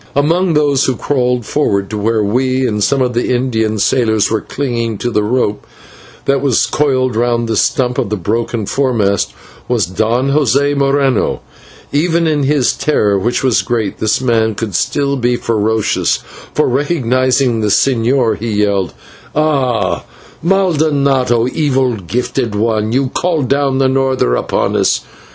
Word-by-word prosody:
Among 165 Hz, +4 st, +2 dB
those 145 Hz, -2 st, +2 dB
who 130 Hz, -, 0 dB
crawled 125 Hz, -3 st, -1 dB
forward 100 Hz, -8 st, 0 dB
to 105 Hz, -, -3 dB
where 110 Hz, +1 st, +1 dB
we 130 Hz, +5 st, 0 dB
and 105 Hz, -1 st, -1 dB
some 135 Hz, +3 st, +2 dB
of 125 Hz, -1 st, -1 dB
the 120 Hz, -, -1 dB
Indian 115 Hz, -4 st, 0 dB
sailors 110 Hz, -1 st, +1 dB
were 110 Hz, -2 st, 0 dB
clinging 120 Hz, -5 st, -3 dB
to 120 Hz, +4 st, -3 dB
the 105 Hz, -, +1 dB
rope 105 Hz, -1 st, -1 dB, 0.6 s
that 140 Hz, -1 st, +1 dB
was 135 Hz, -4 st, +2 dB
coiled 130 Hz, -4 st, 0 dB
round 120 Hz, 0 st, 0 dB
the 115 Hz, -, -1 dB
stump 125 Hz, +2 st, +1 dB
of -, -, -1 dB
the 105 Hz, -, -1 dB
broken 110 Hz, +3 st, -2 dB
foremast, 105 Hz, -6 st, 0 dB, 0.4 s
was 120 Hz, -5 st, +1 dB
Don 115 Hz, +8 st, 0 dB
José 140 Hz, 0 st, +2 dB
Moreno. 140 Hz, -3 st, +1 dB, 0.5 s
Even 165 Hz, +3 st, +1 dB
in 155 Hz, -2 st, +1 dB
his 140 Hz, -2 st, +2 dB
terror, 105 Hz, -9 st, +1 dB
which 120 Hz, +7 st, -1 dB
was 130 Hz, -4 st, +2 dB
great, 110 Hz, -5 st, -2 dB
this 110 Hz, -1 st, +1 dB
man 115 Hz, -4 st, +1 dB
could 110 Hz, -2 st, -4 dB
still 140 Hz, +9 st, 0 dB
be 120 Hz, -1 st, +1 dB
ferocious, 110 Hz, -2 st, 0 dB, 0.4 s
for, 150 Hz, -, +2 dB
recognising 130 Hz, -3 st, +1 dB
the 105 Hz, -, 0 dB
señor, 120 Hz, +2 st, +2 dB
he 105 Hz, -2 st, -1 dB
yelled: 100 Hz, -2 st, 0 dB, 0.4 s
"Ah! 140 Hz, -6 st, 0 dB, 0.4 s
/maldonado/ 145 Hz, -9 st, +2 dB
evil 135 Hz, -4 st, +1 dB
gifted 115 Hz, +4 st, -3 dB
one 110 Hz, 0 st, 0 dB
you 130 Hz, +2 st, +1 dB
called 160 Hz, -3 st, -1 dB
down 140 Hz, -1 st, +1 dB
the 135 Hz, 0 st, +2 dB
norther 130 Hz, -, +1 dB
upon -, -, -1 dB
us. -, -, +2 dB
125 Hz, 150 wpm, -14 LUFS, 110-140 Hz, 0.6 s, Among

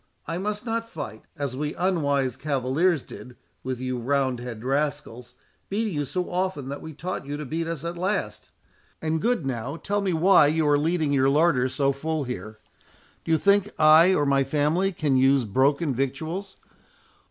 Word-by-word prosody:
I 165 Hz, +1 st, -3 dB
must 210 Hz, +3 st, -3 dB
not 230 Hz, 0 st, -2 dB
fight, 110 Hz, -, -7 dB
as 140 Hz, -3 st, -3 dB
we 150 Hz, +2 st, -3 dB
unwise 145 Hz, -8 st, 0 dB
cavaliers 145 Hz, +4 st, 0 dB
did 125 Hz, -1 st, -11 dB, 0.3 s
with 130 Hz, -1 st, -3 dB
you 130 Hz, -1 st, -3 dB
roundhead 125 Hz, -3 st, -1 dB
rascals, 135 Hz, -3 st, -3 dB, 0.3 s
beating 215 Hz, 0 st, -1 dB
you 145 Hz, -1 st, -1 dB
so 180 Hz, +6 st, -3 dB
often 180 Hz, -7 st, -2 dB
that 140 Hz, -, -6 dB
we 160 Hz, -, -8 dB
taught 160 Hz, -1 st, -5 dB
you 145 Hz, +1 st, -4 dB
to 150 Hz, -, -6 dB
beat 160 Hz, +4 st, -3 dB
us 165 Hz, -2 st, -5 dB
at 170 Hz, +1 st, -4 dB
last. 185 Hz, -, -2 dB, 0.5 s
And 160 Hz, 0 st, -1 dB
good 235 Hz, -, 0 dB
now, 130 Hz, +2 st, -3 dB
tell 205 Hz, +4 st, -2 dB
me 195 Hz, -2 st, 0 dB
why 175 Hz, -1 st, +5 dB
you 155 Hz, 0 st, +1 dB
are 145 Hz, 0 st, +4 dB
leaving 155 Hz, -1 st, 0 dB
your 135 Hz, -1 st, +3 dB
larder 145 Hz, -3 st, +3 dB
so 140 Hz, +1 st, +1 dB
full 155 Hz, +2 st, -2 dB
here? 110 Hz, -4 st, -6 dB, 0.7 s
Do -, -, -3 dB
you 160 Hz, -, +5 dB
think 200 Hz, +3 st, +3 dB
I 160 Hz, +4 st, +7 dB
or 145 Hz, -, +1 dB
my 140 Hz, -1 st, +3 dB
family 150 Hz, +7 st, +1 dB
can 150 Hz, -6 st, 0 dB
use 135 Hz, -1 st, +4 dB
broken 140 Hz, +7 st, +1 dB
victuals? 160 Hz, +10 st, -3 dB
150 Hz, 175 wpm, -25 LUFS, 135-175 Hz, 0.7 s, I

